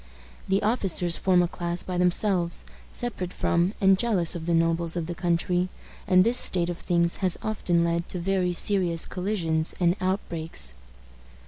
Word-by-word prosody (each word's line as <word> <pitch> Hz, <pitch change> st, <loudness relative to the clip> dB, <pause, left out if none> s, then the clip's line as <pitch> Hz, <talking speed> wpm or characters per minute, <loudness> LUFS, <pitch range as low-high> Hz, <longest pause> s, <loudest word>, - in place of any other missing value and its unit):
The 195 Hz, +2 st, +1 dB
officers 190 Hz, -6 st, +1 dB
form 180 Hz, -2 st, +3 dB
a -, -, 0 dB
class 175 Hz, 0 st, -1 dB
by 180 Hz, -1 st, -3 dB
themselves, 180 Hz, -1 st, 0 dB, 0.2 s
separate 200 Hz, -7 st, -4 dB
from, 175 Hz, +4 st, 0 dB
and 190 Hz, -1 st, +4 dB
jealous 200 Hz, -9 st, +3 dB
of 165 Hz, -1 st, -6 dB
the 170 Hz, -, +1 dB
nobles 165 Hz, 0 st, +1 dB
of 170 Hz, -2 st, -2 dB
the 175 Hz, -, -5 dB
country; 175 Hz, +1 st, 0 dB, 0.4 s
and 185 Hz, -2 st, +5 dB
this 235 Hz, +4 st, +4 dB
state 175 Hz, -1 st, +1 dB
of 175 Hz, -, -8 dB
things 170 Hz, -1 st, +2 dB
has 185 Hz, -3 st, +1 dB
often 175 Hz, -5 st, 0 dB
led 170 Hz, +1 st, -1 dB
to -, -, -3 dB
very 180 Hz, 0 st, 0 dB
serious 175 Hz, -2 st, +1 dB
collisions 170 Hz, -5 st, -2 dB
and 175 Hz, -1 st, +2 dB
outbreaks. 165 Hz, -, -3 dB
175 Hz, 160 wpm, -25 LUFS, 170-190 Hz, 0.4 s, and